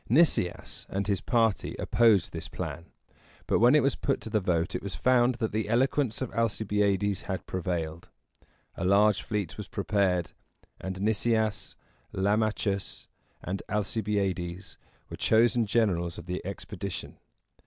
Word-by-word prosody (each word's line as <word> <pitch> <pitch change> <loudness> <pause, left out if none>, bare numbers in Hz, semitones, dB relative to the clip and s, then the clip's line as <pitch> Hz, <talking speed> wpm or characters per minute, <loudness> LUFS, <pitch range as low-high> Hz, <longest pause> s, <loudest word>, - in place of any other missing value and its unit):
Nicias 125 - +2
and 100 +1 -2
his 100 -2 0
party 115 -4 +1
opposed 110 -7 +3
this - - -6
plan; 85 - -5 0.6
but - - +2
when 120 +5 +6
it 150 - +5
was 140 - +2
put 135 - -1
to 110 - -7
the 110 - +3
vote, 90 -3 0
it - - -2
was 100 -5 -6
found 125 +7 +3
that 115 -2 -2
the 110 0 -2
eloquence 130 +1 +1
of 130 - -6
Alcibiades 105 -3 +1
had 95 - -3
prevailed. 85 -3 -3 0.6
A - - -5
large 100 +2 +4
fleet 105 -6 -3
was 105 -3 -6
prepared, 95 -4 0 0.5
and 95 0 -5
Nicias, 110 0 0 0.4
Lam´a 105 +3 +2
chus, 100 -2 -4 0.3
and 95 +2 -3
Alcibiades 100 -3 -2 0.4
were - - -6
chosen 115 0 +3
generals 90 -6 +1
of 85 - -8
the 90 0 -4
expedition. 100 0 -6
100 Hz, 145 wpm, -28 LUFS, 95-110 Hz, 0.6 s, when